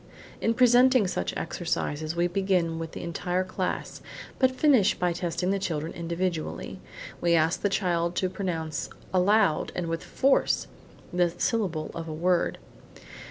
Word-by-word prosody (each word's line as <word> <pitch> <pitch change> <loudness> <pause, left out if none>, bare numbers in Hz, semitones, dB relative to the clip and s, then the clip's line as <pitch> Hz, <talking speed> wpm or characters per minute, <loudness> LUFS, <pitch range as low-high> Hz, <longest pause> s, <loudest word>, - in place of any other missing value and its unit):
In 230 - +1
presenting 250 -1 +5
such 90 - -2
exercises 155 +2 -2
we 170 0 +2
begin 175 -3 0
with 165 -1 -6
the - - -6
entire 180 +2 -1
class, 185 0 -4 0.4
but 260 - +5
finish 255 -6 +3
by 180 -1 0
testing 175 +1 -1
the 200 - 0
children 160 -4 -3
individually. 170 -1 -3 0.4
We 170 -1 +3
ask 165 +2 +2
the 205 - +2
child 175 -3 0
to 185 - +1
pronounce, 165 -6 -3 0.2
aloud 190 -2 +3
and 180 - -2
with 165 0 -3
force, 270 +1 +2 0.5
the 175 0 +3
first 170 - -13
syllable 185 -10 0
of 165 0 -6
a 160 - -4
word. 175 +2 +1
180 Hz, 150 wpm, -27 LUFS, 165-195 Hz, 0.5 s, presenting